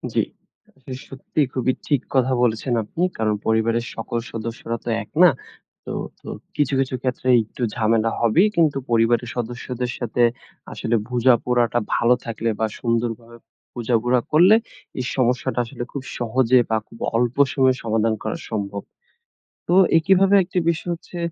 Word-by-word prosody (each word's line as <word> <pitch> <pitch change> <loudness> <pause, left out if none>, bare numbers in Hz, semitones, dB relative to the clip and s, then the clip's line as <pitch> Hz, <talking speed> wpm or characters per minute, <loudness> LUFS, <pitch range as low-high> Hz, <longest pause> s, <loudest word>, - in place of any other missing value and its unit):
জি। - - +3 0.6
আসলে 130 -1 -9
সত্যিই 135 +1 -2
খুবই 130 0 +1
ঠিক 145 -4 +2
কথা 130 0 +3
বলেছেন 120 +1 0
আপনি। 165 +11 -3
কারণ 110 -1 +1
পরিবারের 115 +1 +1
সকল 115 +1 -4
সদস্যরা 115 0 -5
তো - - -3
এক - - -20
না। 180 - +9 0.6
তো - - -6 0.3
তো - - -9 0.3
কিছু, 145 -2 0
কিছু 130 -1 0
ক্ষেত্রে 130 0 -3 0.2
একটু 110 +3 -12
ঝামেলা 115 0 +2
হবেই। 140 - +4
কিন্তু 155 -4 +3
পরিবারের 115 +1 +2
সদস্যদের 120 +1 -4
সাথে 120 0 0 0.5
আসলে 115 - -1
বুঝাপড়াটা 120 -1 +2 0.2
ভালো 120 +1 +4
থাকলে 115 0 -2
বা, 110 - +2
সুন্দরভাবে 115 0 -2 0.4
বুঝাপড়া 120 +1 +1
করলে, 175 +7 +7 0.4
এই 125 - -2
সমস্যাটা 125 -1 0
আসলে 120 +1 -6
খুব 140 - -5 0.2
সহজে 125 +1 +3
বা, 110 - +2
খুব 115 - -15 0.2
অল্প 120 +1 0 0.2
সময়ে 130 -2 +3
সমাধান 110 0 +1
করা 110 - -3
সম্ভব। 100 -2 -3 0.9
তো 175 - +3 0.2
একইভাবে 195 +3 +4
একটি 180 +1 -3
বিষয় 170 +1 -3
হচ্ছে 175 +1 -10
120 Hz, 145 wpm, -22 LUFS, 115-130 Hz, 0.9 s, না